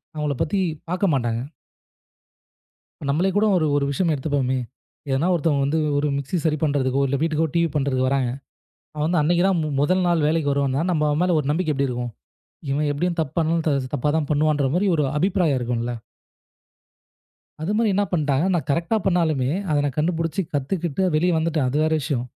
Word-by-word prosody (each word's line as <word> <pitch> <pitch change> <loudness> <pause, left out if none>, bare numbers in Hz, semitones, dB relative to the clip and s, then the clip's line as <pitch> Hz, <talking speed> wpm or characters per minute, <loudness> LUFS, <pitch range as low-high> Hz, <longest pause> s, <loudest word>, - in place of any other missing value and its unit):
அவங்கள 150 -2 -1
பத்திப் 180 -2 -1 0.2
பார்க்க 185 0 +1
மாட்டாங்க." 120 -3 -1 1.7
நம்மளே 165 +7 +2
கூட 210 +1 +3
ஒரு, 160 -3 +2
ஒரு 145 - +1
விஷயம் 165 +4 +1
எடுத்துக்குவோமே. 135 -2 -1 0.6
ஏன்னா, 140 +6 +1
ஒருத்தங்க 150 -4 +1
வந்து 145 +4 0 0.2
ஒரு 145 +1 +1
மிக்ஸி 140 +5 -3
சரி 155 -2 +2
பண்ணுறதுக்கோ, 140 -3 +1
இல்ல 140 +1 0
வீட்டுக்கோ, 160 0 +1
TV 170 0 +3
பண்ணுறதுக்கு 135 -3 +1
வராங்க. 135 -2 +1 0.7
அவன் 150 0 0
வந்து 170 0 +2
அன்னைக்குத்தான் 175 +3 +2 0.2
முதல் 185 +5 +2
நாள் 170 -3 +2
வேலைக்கு 155 -3 +1
வருவாங்க. 140 -1 0
நம்ம 150 -2 +1
அவன் 145 +2 0
மேல 180 -2 +2
ஒரு 140 - -4
நம்பிக்கை 160 +1 0
எப்படி 140 0 0
இருக்கும்? 120 -1 -4 0.6
இவன் 145 +2 0
எப்படியும் 170 +4 -2
தப்பு 150 -4 -3
பண்ல 160 -2 +1 0.2
தப்பாதான் 150 +3 0
பண்ணுவான்ற 150 -1 +2
மாதிரி 195 +3 +2
ஒரு 150 - +1
அபிப்ராயம் 180 -5 +1
இருக்கும்ல. 120 0 -2 1.7
அதே 175 +6 -1
மாதிரி 225 -2 +2
என்ன 205 +1 +2
பண்ணிட்டாங்க? 150 -3 +1
நான் 160 -6 -1
கரெக்டா 170 +9 +1
பண்ணாலுமே, 160 -8 +1 0.2
அதை 150 - +2
நான் 140 -3 -2
கண்டுபிடிச்சு 165 +1 0
கத்துக்கிட்டு 160 +4 -1
வெளியே 175 +4 +2
வந்துட்டேன். 160 -3 0
அது 130 - -2
வேற 160 0 +1
விஷயம். 135 -4 -2
150 Hz, 165 wpm, -23 LUFS, 140-170 Hz, 1.7 s, கூட